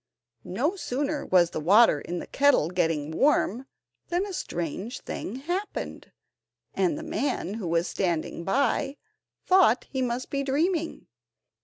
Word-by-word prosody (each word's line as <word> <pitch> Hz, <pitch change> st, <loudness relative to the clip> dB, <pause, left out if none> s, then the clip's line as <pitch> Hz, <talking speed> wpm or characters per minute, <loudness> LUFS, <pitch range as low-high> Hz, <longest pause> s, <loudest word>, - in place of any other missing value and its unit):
No 280 Hz, -, 0 dB
sooner 290 Hz, -3 st, -2 dB
was 175 Hz, -2 st, +4 dB
the -, -, -3 dB
water 185 Hz, -1 st, +5 dB
in 175 Hz, -, -4 dB
the -, -, -5 dB
kettle 280 Hz, -, +3 dB
getting 165 Hz, -4 st, 0 dB
warm 265 Hz, -, +2 dB, 0.4 s
than 350 Hz, +3 st, 0 dB
a 400 Hz, -, -6 dB
strange 185 Hz, -, -4 dB
thing 210 Hz, -, -5 dB
happened, 350 Hz, +10 st, -4 dB, 0.6 s
and 335 Hz, -5 st, +1 dB
the 315 Hz, -, -6 dB
man, 285 Hz, -, -2 dB
who 215 Hz, -5 st, -4 dB
was 170 Hz, +1 st, +1 dB
standing 170 Hz, -2 st, -2 dB
by, 275 Hz, +6 st, 0 dB, 0.5 s
thought 365 Hz, -11 st, +4 dB
he 265 Hz, -, -1 dB
must 245 Hz, 0 st, -2 dB
be 275 Hz, -, 0 dB
dreaming. 320 Hz, +5 st, -1 dB
255 Hz, 140 wpm, -27 LUFS, 180-295 Hz, 0.6 s, water